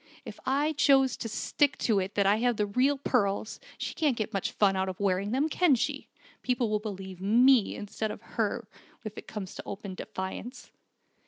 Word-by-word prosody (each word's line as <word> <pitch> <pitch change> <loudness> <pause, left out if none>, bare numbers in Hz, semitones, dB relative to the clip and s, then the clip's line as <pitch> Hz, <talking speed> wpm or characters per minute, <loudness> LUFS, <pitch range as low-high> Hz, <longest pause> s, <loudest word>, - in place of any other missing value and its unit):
If - - -9
I 290 +4 +2
choose 270 -3 +4
to 225 - -5
stick 275 +5 +1
to 215 -4 +2
it 190 +2 -4
that 200 - +2
I 200 +2 +4
have 240 0 +1
the 210 - +1
real 255 +7 +2
pearls, 220 -6 0 0.2
she - - -4
can't 295 -7 +1
get 220 +1 -3
much 195 - -1
fun 195 -2 +3
out 190 0 0
of 185 - -7
wearing 200 0 +1
them, 265 +7 +1
can 320 -2 +3
she? 235 - -2 0.3
People 245 -3 0
will 210 - +2
believe 190 -3 -7
me, 235 +3 +4
instead 215 +1 -4
of 210 - -8
her, 225 0 -1 0.4
if 215 -1 -6
it - - -9
comes 200 -3 -6
to - - -8
open 200 -1 -6
defiance." 190 +7 -6
215 Hz, 195 wpm, -29 LUFS, 200-260 Hz, 0.4 s, choose